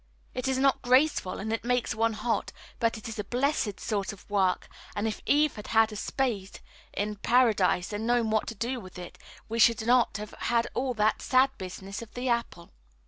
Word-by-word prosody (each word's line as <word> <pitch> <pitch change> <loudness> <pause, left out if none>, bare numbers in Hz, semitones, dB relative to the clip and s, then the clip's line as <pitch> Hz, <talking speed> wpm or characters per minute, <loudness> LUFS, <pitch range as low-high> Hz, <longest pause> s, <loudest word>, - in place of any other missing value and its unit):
It 255 +1 -3
is 265 -1 +1
not 270 0 +3
graceful, 255 -5 +2
and 220 +3 -3
it 225 - -2
makes 245 0 0
one 225 +1 +1
hot; 225 +2 -1 0.3
but 230 -1 +1
it 220 - -8
is 225 -1 -6
a - - -1
blessed 245 -2 -1
sort 200 -2 -2
of 200 - -14
work, 190 -3 +1 0.3
and 205 +2 -1
if 215 - -4
Eve 300 0 +4
had 210 - -8
had 225 0 +4
a - - -7
spade 210 -4 -2 0.3
in 210 +1 -3
Paradise 210 -5 +2
and 215 +2 -3
known 240 -2 +2
what 220 -1 +1
to 230 - -5
do 240 +4 -2
with 185 -5 -11
it, 180 -1 -9 0.3
we 230 +1 -3
should 225 -1 +5
not 240 -3 +3
have 210 0 -7
had 235 -1 +1
all 255 -1 -1
that 215 0 +2
sad 260 +1 +4
business 190 +2 -6
of 230 - -11
the 250 +1 -3
apple. 235 -7 -2
225 Hz, 205 wpm, -28 LUFS, 205-245 Hz, 0.3 s, should